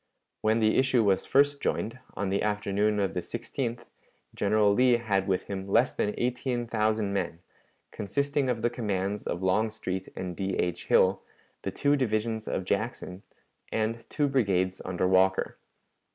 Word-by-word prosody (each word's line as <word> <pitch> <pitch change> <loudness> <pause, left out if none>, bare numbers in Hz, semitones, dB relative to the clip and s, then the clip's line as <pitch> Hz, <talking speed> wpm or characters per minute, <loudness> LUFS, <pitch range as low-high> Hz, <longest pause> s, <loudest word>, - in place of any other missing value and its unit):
When 110 +1 +2
the 110 0 +3
issue 130 -3 +3
was 95 -2 +2
first 140 +1 +3
joined, 115 +4 -2 0.2
on 100 -1 -2
the 100 +1 0
afternoon 105 0 0
of 100 -1 0
the 90 - -1
16th, 120 +5 -4 0.5
General 105 0 +3
Lee 125 +2 +4
had 100 -4 0
with 95 -2 +1
him 95 -1 -5
less 120 +6 +3
than 105 - -1
eighteen 125 0 -1
thousand 110 -2 0
men, 95 -4 -2 0.5
consisting 140 +6 -1
of 115 -3 -1
the 120 - +2
commands 105 -4 -2
of 85 - -3
Longstreet 95 -1 -1
and 90 -1 -5
D. 95 0 -2
H. 90 -1 -2
Hill, 95 +1 +4 0.4
the - - -3
two 145 0 +2
divisions 110 -3 -1
of 95 - -2
Jackson, 100 -2 -3 0.5
and 110 +1 -2
two 145 -1 +1
brigades 95 -9 +1
under 95 0 -1
Walker. 95 0 +2
105 Hz, 155 wpm, -28 LUFS, 95-120 Hz, 0.5 s, Lee